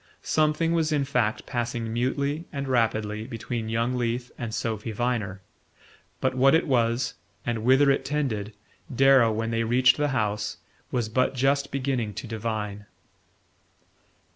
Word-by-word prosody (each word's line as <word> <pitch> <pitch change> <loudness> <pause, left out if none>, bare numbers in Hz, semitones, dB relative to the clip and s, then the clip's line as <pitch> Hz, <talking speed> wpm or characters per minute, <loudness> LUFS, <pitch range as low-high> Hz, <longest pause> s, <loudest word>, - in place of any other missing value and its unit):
Something 155 +2 +2
was 160 -2 +1
in 145 -2 +1
fact 125 -6 0
passing 120 -2 -3
mutely 140 +6 -1
and 140 -1 -4
rapidly 110 -3 0
between 115 -1 -4
young 115 +2 0
Leath 120 0 -2
and 115 -2 -5
Sophy 110 0 -3
Viner; 110 -4 -2 0.8
but 130 - +1
what 135 +3 +5
it 165 - +2
was, 120 -3 +1 0.3
and 115 -2 -2
whither 135 +3 +5
it 135 - +1
tended, 115 -8 -2 0.4
Darrow, 135 -2 +5
when 115 +1 -2
they 115 0 0
reached 125 +2 +4
the 150 0 +1
house, 105 -6 -1 0.3
was 120 -3 -1
but 130 +4 +1
just 140 +2 +1
beginning 130 -6 -1
to - - -5
divine... 105 -2 -4
120 Hz, 140 wpm, -26 LUFS, 110-135 Hz, 0.8 s, what